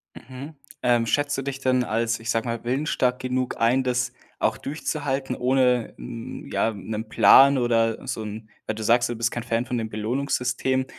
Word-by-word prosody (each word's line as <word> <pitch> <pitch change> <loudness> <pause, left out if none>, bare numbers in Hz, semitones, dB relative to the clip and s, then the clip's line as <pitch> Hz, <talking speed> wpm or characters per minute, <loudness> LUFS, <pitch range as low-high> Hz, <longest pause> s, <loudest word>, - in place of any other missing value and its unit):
Mhm. 135 +4 -10 0.3
Ähm, 120 -2 +3
schätzt 145 +4 0
du - - -1
dich 135 0 -4
dann 130 -2 +2
als, 115 0 -1
ich 115 - -7
sage 115 +1 +1
mal, 115 -1 -3
willensstark 125 0 0
genug 130 0 -2
ein, 120 +3 +3
das 125 0 -1 0.3
auch - - +1
durchzuhalten, 140 -3 -3
ohne 125 -2 +1
'n - - -8
ja 115 - +1
'nen 110 +2 -6
Plan 140 +4 +7
oder 115 -2 +1
so - - -3
'n 110 +1 -8 0.2
weil 110 - -2
du 110 - -5
sagst, 120 +2 +3
du 120 - -3
bist 115 +1 0
kein 120 - -4
Fan 115 0 -1
von 125 -1 -2
dem 110 -1 -4
Belohnungssystem. 125 +3 -1
125 Hz, 185 wpm, -24 LUFS, 115-130 Hz, 0.3 s, Plan